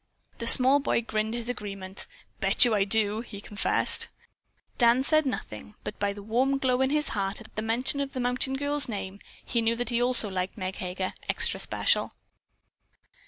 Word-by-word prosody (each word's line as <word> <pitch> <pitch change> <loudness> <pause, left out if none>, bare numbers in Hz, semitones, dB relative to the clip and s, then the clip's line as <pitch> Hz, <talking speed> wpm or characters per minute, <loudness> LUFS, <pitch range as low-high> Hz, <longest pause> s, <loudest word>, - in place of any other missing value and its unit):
The 235 - -5
small 265 +4 +9
boy 275 -4 -1
grinned 220 0 -3
his 235 -1 -6
agreement. 195 -5 -5 0.3
"Bet - - +4
you 240 - +1
I 200 -2 +2
do," 210 +1 +2
he 215 -4 -10
confessed. 205 0 0 0.7
Dan 240 +1 +4
said 310 +1 +2
nothing, 215 -4 -6
but 210 - -7
by 205 0 0
the 200 0 -10
warm 255 +6 0
glow 255 -1 0
in 265 - +2
his 300 +1 0
heart 195 -1 -3
at 220 - -16
the 215 - -3
mention 235 +5 -1
of 280 -1 -4
the 255 - -5
mountain 250 +2 -1
girl's 285 0 +1
name, 200 -2 -6 0.3
he 235 - -1
knew 225 +1 0
that 240 0 -4
he 240 0 0
also 245 -3 +5
liked 185 0 -4
Meg 185 -1 -5
Heger 185 +1 -4 0.2
extra - - 0
special. - - -1
230 Hz, 185 wpm, -26 LUFS, 205-255 Hz, 0.7 s, small